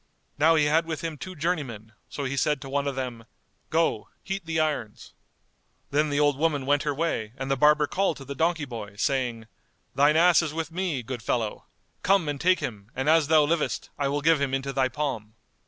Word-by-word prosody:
Now 160 +2 +5
he 155 -2 +3
had 160 +3 +2
with 160 -2 -4
him 165 -2 -4
two 185 +6 -8
journeymen, 140 - -3 0.2
so 145 - -5
he 135 0 -2
said 150 +1 +1
to 135 - -8
one 140 +1 -1
of 140 - -2
them 125 -3 -5 0.4
"Go, 160 -10 0
heat 195 -3 -5
the 160 -1 0
irons." 145 -9 -2 0.8
Then 150 +2 +2
the 145 0 0
old 145 -2 +2
woman 150 -4 +1
went 145 +1 +2
her 145 -1 -1
way 135 -9 -2
and 135 0 -3
the - - +3
barber 150 +2 +4
called 180 +3 0
to 135 - -10
the 140 - -5
donkey 160 +2 0
boy,[FN#202] 105 -5 -8
saying, 120 -4 -1 0.5
"Thine 145 +2 +4
ass 175 +1 +6
is 155 -2 -4
with 165 0 -3
me, 170 -7 -2
good 120 0 -5
fellow! 115 -2 -2 0.3
come 195 -4 +3
and 145 -2 -3
take 185 +2 +3
him, 105 -3 -6
and 130 +2 -2
as 160 -1 +4
thou 155 -1 +5
livest, 155 +1 -1
I 140 - +1
will 145 +1 -1
give 160 0 +3
him 135 -1 0
into 135 +1 -3
thy 130 -1 +2
palm." 120 -7 -4
145 Hz, 215 wpm, -26 LUFS, 130-160 Hz, 0.8 s, ass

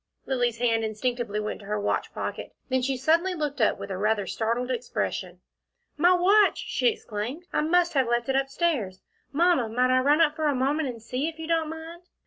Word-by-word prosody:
Lilly's 245 -3 0
hand 230 -1 +1
instinctively 220 0 -2
went 210 0 -4
to 200 - -13
her 210 0 -1
watch 205 - -1
pocket - - -5
then 260 0 +1
she 265 +1 -1
suddenly 330 +7 +2
looked 295 -5 -3
up 215 - +3
with 200 - -7
a 185 - -3
rather 210 -1 +1
startled 235 +5 -1
expression. 250 -1 -3 0.5
"My 345 +4 +4
watch!" 390 +3 +4
she - - -1
exclaimed. 265 - -3
"I - - +2
must 345 +2 +2
have 265 -4 +2
left 240 0 0
it 265 - 0
up 270 0 +1
stairs. 270 - -1 0.3
Mamma 320 -6 +2
might 250 +3 +2
I - - +5
run 290 +4 +3
up 310 -2 +3
for 315 -1 0
a 290 - +1
moment 280 +3 0
and 230 -3 -8
see, 255 +5 -2
if 325 -1 -6
you 320 - -6
don't 325 -1 0
mind?" 325 +2 -8
265 Hz, 210 wpm, -26 LUFS, 230-320 Hz, 0.5 s, I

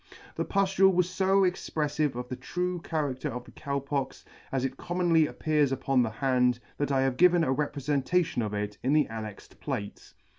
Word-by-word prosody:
The - - -1
puftule 195 -1 +3
was 180 0 0
fo 195 +1 +3
expreflive 150 -5 -1
of 125 0 -5
the 130 - -4
true 180 +8 -3
character 150 -3 -2
of 125 -1 -5
the - - -15
Cow 140 -1 -3
Pox, 140 -1 -3 0.3
as 135 -1 0
it 135 0 -3
commonly 170 -1 +2
appears 150 -3 +1
upon 135 0 +1
the 115 - +1
hand, 125 0 +1 0.2
that 145 -1 0
I 135 -1 +3
have 135 -1 0
given 175 -1 +5
a 130 - +2
reprefentation 145 +2 0
of 105 -2 -2
it 105 0 -4
in 135 +3 +1
the 150 -2 +4
annexed 110 -3 -8
plate. 120 -8 -6
140 Hz, 185 wpm, -28 LUFS, 130-170 Hz, 0.3 s, given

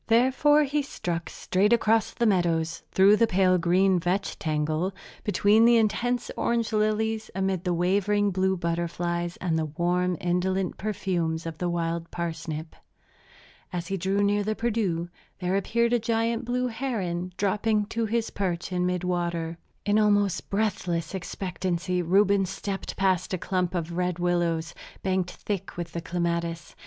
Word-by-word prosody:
Therefore 265 +6 +4
he 290 +1 0
struck 175 -11 -4
straight 200 +4 +1
across 225 -1 +3
the 235 - -1
meadows, 170 -5 +1
through 200 +2 +6
the 230 - +4
pale 185 -2 +3
green 185 +2 +3
vetch 185 +3 -1
tangle, 155 +4 -1 0.3
between 205 +2 +4
the 235 0 +6
intense 235 +3 0
orange 235 -1 0
lilies, 215 +1 0
amid 190 -2 0
the 180 - +1
wavering 200 +3 +2
blue 190 0 +1
butterflies 170 0 -2
and 165 -3 0
the 160 - 0
warm, 175 +3 0
indolent 180 +1 -1
perfumes 180 -6 -1
of 165 -1 -6
the 180 - 0
wild 170 -1 -2
parsnip. 160 -2 -5 1.0
As 175 -2 -4
he 195 - 0
drew 195 +2 0
near 205 0 +2
the 215 +1 -1
Perdu 210 -8 -1 0.3
there 185 0 -1
appeared 235 +4 +1
the 240 - +3
giant 230 +1 0
blue 250 +1 0
heron, 210 -8 -2
dropping 210 +1 +1
to 230 -1 -1
his 230 +1 -1
perch 185 -2 -2
in 180 0 +1
mid 180 0 -1
water. 170 -2 -2 0.3
In 210 +1 +3
almost 205 -3 +2
breathless 185 -5 -1
expectancy 180 -1 -2
Reuben 195 +2 +3
stepped 195 +1 -5
past 190 -1 +1
a - - -3
clump 180 0 -1
of 170 -1 -3
red 180 -1 0
willows, 175 -2 0 0.3
banked 185 -1 0
thick 200 -2 -5
with 170 -1 -5
clematis. 170 -2 -2
185 Hz, 150 wpm, -26 LUFS, 175-210 Hz, 1.0 s, through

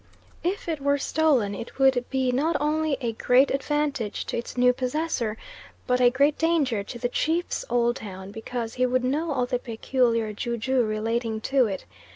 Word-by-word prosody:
If 365 +3 -2
it 315 -4 -2
were 285 +1 +2
stolen 280 -8 +2
it 230 - -8
would 265 -2 +3
be 260 -2 +1
not 300 +7 +1
only 305 0 0
a 235 -2 -1
great 250 +4 +3
advantage 280 -4 -1
to - - -4
its 235 - -8
new 250 0 +5
possessor, 250 -4 -2 0.5
but 250 -1 +1
a 245 - +7
great 280 +4 +2
danger 295 -10 +1
to 225 - -8
the 245 +1 -1
chief's 325 +7 -1
old 240 0 +2
town; 190 -2 -8
because 225 +1 -5
he 255 0 +1
would 255 0 +1
know 300 +6 0
all 255 -3 +1
the 250 0 -1
peculiar 230 -2 0
ju 235 +3 -3
ju 260 +2 +1
relating 220 +1 -1
to 265 0 +2
it. 195 - -5
250 Hz, 185 wpm, -25 LUFS, 230-285 Hz, 0.5 s, a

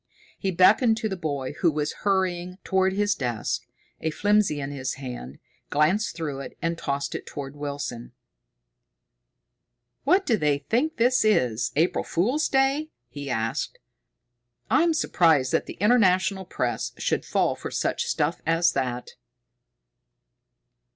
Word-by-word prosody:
He 195 - -1
beckoned 215 +6 +5
to 225 - -1
the 190 - -2
boy 145 -6 -3
who 170 - +4
was 150 0 -2
hurrying 185 -2 0
toward 190 0 +2
his 205 +1 +2
desk, 120 - -3 0.3
a 160 - -1
flimsy 205 -2 +2
in 140 0 -4
his 130 -2 -3
hand, 125 - -7 0.3
glanced 165 +9 +1
through 150 -5 -4
it, 140 - -8
and 165 0 -1
tossed 140 -3 -3
it - - -6
toward 140 -1 -7
Wilson. 140 -5 -5 1.9
"What 370 +7 +3
do 225 - +2
they 150 -5 +2
think 240 - -1
this 245 +1 +3
is, 125 - +2
April 160 +4 +2
Fool's 250 - 0
Day?" 275 +3 +2 0.2
he 145 -1 -7
asked. 115 -2 -2 0.9
"I'm 335 -1 +4
surprised 160 - +3
that - - +1
the - - -6
International 190 -3 +3
Press 120 -9 -2
should - - 0
fall - - +1
for - - -6
such - - -1
stuff 150 +4 0
as 165 +1 +3
that!" 125 -1 -3
170 Hz, 135 wpm, -25 LUFS, 140-205 Hz, 1.9 s, beckoned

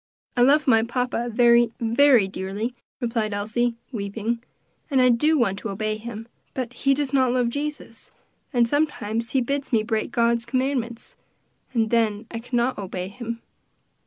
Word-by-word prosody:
"I 245 - +2
love 290 +5 +5
my 225 -3 +6
papa 240 0 -1
very, 235 0 +5
very 235 -1 +4
dearly," 195 +5 -4 0.3
replied 230 -4 -1
Elsie, 230 +4 0 0.2
weeping, 225 +1 -3 0.5
"and 270 -3 +2
I 255 0 +6
do 300 +7 +3
want 200 -6 +1
to 225 - -5
obey 215 +2 -2
him; 225 0 -7 0.3
but 250 -2 -3
he 275 +2 +2
does 285 -1 -2
not 260 -2 +3
love 245 -1 +1
Jesus, 285 -3 -5 0.4
and 240 -4 +3
sometimes 235 -6 -1
he 265 - +3
bids 275 +3 -2
me 225 -3 +3
break 220 -1 -1
God's 235 0 +2
commandments, 255 -2 -2 0.6
and 225 -3 0
then 225 -2 +1
I 230 - -4
cannot 240 +1 -1
obey 185 -1 -4
him." 230 +1 -6
235 Hz, 160 wpm, -24 LUFS, 220-255 Hz, 0.6 s, my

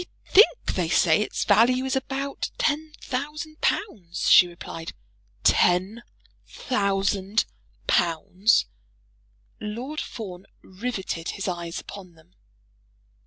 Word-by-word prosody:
"I - - -23
think 430 +4 +5
they - - -1
say - - +4
its - - -2
value 250 +3 +4
is 265 - -1
about 270 +1 -3
ten 310 +1 0
thousand 300 +4 -5
pounds," 190 - -1
she 180 - +9
replied. 165 -1 -8 0.5
"Ten 190 +6 +3 0.5
thousand 200 -2 0 0.4
pounds!" 180 +5 +2 0.9
Lord 245 +9 -5
Fawn 195 -5 -8 0.2
riveted 190 -4 -4
his 195 - -4
eyes 170 -2 -4
upon 185 -4 -11
them. 165 +3 -23
205 Hz, 105 wpm, -25 LUFS, 180-265 Hz, 0.9 s, she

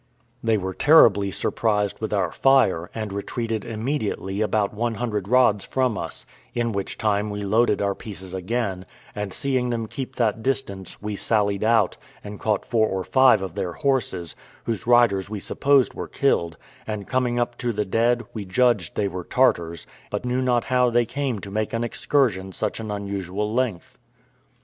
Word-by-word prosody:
They 115 -1 +3
were 95 -1 -3
terribly 105 - +5
surprised 105 +2 -1
with 110 - -3
our 95 -5 0
fire, 125 -11 +3
and 110 -3 -4
retreated 110 +1 -3
immediately 110 -4 -3
about 105 -1 +1
one 115 +2 -1
hundred 105 -5 -2
rods 120 -4 +4
from 130 -4 0
us; - - -5 0.3
in 120 -1 0
which 100 -2 -4
time 105 -1 0
we 105 0 -4
loaded 105 0 +2
our 100 0 +1
pieces 95 -3 -9
again, 95 -1 -2 0.3
and 105 -2 -4
seeing 130 +2 -1
them 115 -2 -2
keep 130 +4 -6
that 115 -2 0
distance, 110 -8 -3
we 105 0 -3
sallied 100 -1 +1
out, 110 -1 +3 0.3
and 105 0 -8
caught 105 -2 0
four 110 -2 +2
or 95 -2 -2
five 130 -5 +5
of 95 - -5
their 90 - -3
horses, 100 - -1 0.3
whose 115 -1 -3
riders 115 -6 +4
we 105 -1 -4
supposed 135 +6 +2
were - - -6
killed; 85 -12 0 0.3
and 105 -2 -4
coming 125 -2 0
up 120 0 0
to 120 - -1
the 105 -1 -1
dead, 120 +4 +1
we 110 - -4
judged 105 -2 +1
they 105 - +1
were 90 -1 -5
Tartars, 85 -11 +1 0.2
but - - -3
knew 125 +1 0
not 125 -2 +2
how 125 -1 +2
they 120 0 +2
came 135 -1 -2
to 100 - -8
make 110 +1 -2
an 115 +1 0
excursion 115 -6 0
such 105 +4 -3
an 110 -1 -5
unusual 100 0 -3
length. 120 -8 -2
110 Hz, 175 wpm, -24 LUFS, 100-120 Hz, 0.3 s, terribly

